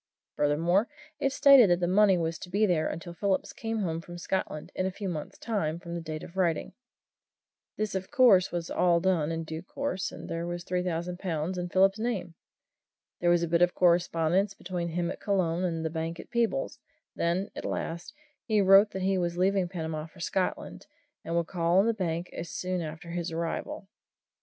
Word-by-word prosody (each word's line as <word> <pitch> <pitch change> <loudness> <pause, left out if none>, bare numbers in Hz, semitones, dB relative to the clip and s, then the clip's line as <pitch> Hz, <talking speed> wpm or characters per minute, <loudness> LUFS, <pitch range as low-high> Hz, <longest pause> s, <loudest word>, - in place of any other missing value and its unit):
Furthermore, 170 - +2 0.3
it 275 -2 +1
stated 275 -7 +7
that 175 0 +3
the 175 - +1
money 195 0 +5
was 165 -1 -2
to 180 - -9
be 205 +4 +2
there 170 -5 +1
until 170 +1 -6
Phillips 190 +2 -1
came 225 -1 -3
home 165 -3 -2
to 175 +1 -10
Scotland, 170 -4 -3
in 185 - -1
a - - -2
few 195 +1 -5
months' 155 -5 -5
time 195 -9 -2
from 170 -1 -8
the 170 - -3
date 155 -1 -6
of 180 - -11
writing. 170 -4 0 1.0
This, 215 -1 -2
of 190 -1 -3
course, 240 -10 +5
was 170 -1 -4
all 175 -1 +3
done 170 -4 +1
in 165 0 -3
due 160 0 -6
course 275 +2 -3
there 165 +1 -4
was 175 0 -4
the - - -22
three 180 0 +1
thousand 175 0 -3
pounds 170 -1 -2
in 180 0 -3
Phillips's 195 +3 +3
name. 220 -8 -2 0.9
There 175 - +2
was 175 0 +4
a - - 0
bit 170 +1 +2
of 175 0 +3
correspondence 175 +2 +2
between 175 -2 -4
him 170 +1 -1
at - - -8
Colon 185 -4 0
and 165 -3 -1
the 160 - -1
bank 165 +1 -4
at - - -11
Peebles 230 - 0 0.4
then, 175 +4 -1
at - - -6
last, 170 +1 -4 0.3
he 215 -3 +2
wrote 195 +1 +7
that 190 - -3
he 190 0 +2
was 175 -1 -1
leaving 190 0 +2
Panama 160 -3 -4
for 170 - -18
Scotland, 185 +2 -2 0.4
and 165 - -3
would 170 -1 +2
call 170 0 +1
on 195 - +5
the 230 - +2
bank 175 -4 -3
soon 180 +1 -3
after 160 +1 -7
his 175 0 -3
arrival. 165 +4 -4
175 Hz, 200 wpm, -28 LUFS, 165-190 Hz, 1.0 s, stated